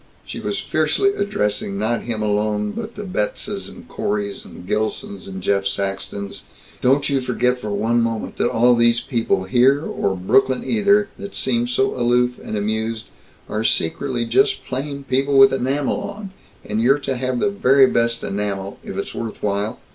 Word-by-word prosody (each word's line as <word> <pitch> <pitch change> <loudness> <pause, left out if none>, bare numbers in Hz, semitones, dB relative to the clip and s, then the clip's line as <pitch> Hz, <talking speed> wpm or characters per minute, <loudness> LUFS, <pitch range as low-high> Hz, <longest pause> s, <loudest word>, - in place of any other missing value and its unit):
She - - -7
was - - -2
fiercely 400 0 +1
addressing 105 - -1
not 110 +3 0
him 110 -2 -2
alone 105 0 0
but 230 0 -6
the 210 - -6
Betzes 195 - -3
and 245 +1 -13
Coreys 205 -1 -3
and 90 - -12
Gilsons 105 -1 -3
and 95 -1 -7
Jeff 100 0 +1
Saxtons, 100 0 -4 0.4
"don't 135 +3 +3
you 140 -2 +1
forget 125 0 0
for 105 - -5
one 110 +4 +1
moment 115 -1 -2
that - - +2
all 120 +2 +4
these 120 0 +4
people 115 -7 0
here 130 +9 +3
or 95 - -1
Brooklyn 130 +7 +2
either 205 -2 +3
that 200 - -7
seem 120 -2 0
so 125 +2 +1
aloof 125 0 +1
and 110 - -5
amused, 110 +2 -2 0.4
are 110 +1 -2
secretly 120 +6 0
just 125 +4 +2
plain 140 +2 -4
people 135 +1 +1
with 135 0 +8
enamel 135 +2 0
on, 200 -2 -7 0.3
and 105 +1 -1
you're 135 +4 +4
to 135 -2 -3
have 130 0 -1
the 200 - +1
very 135 -8 +5
best 115 -2 +1
enamel, 100 -1 -3
if - - -7
it's - - -4
worth 115 -2 -6
while. 105 +3 -1
120 Hz, 170 wpm, -21 LUFS, 105-135 Hz, 0.4 s, with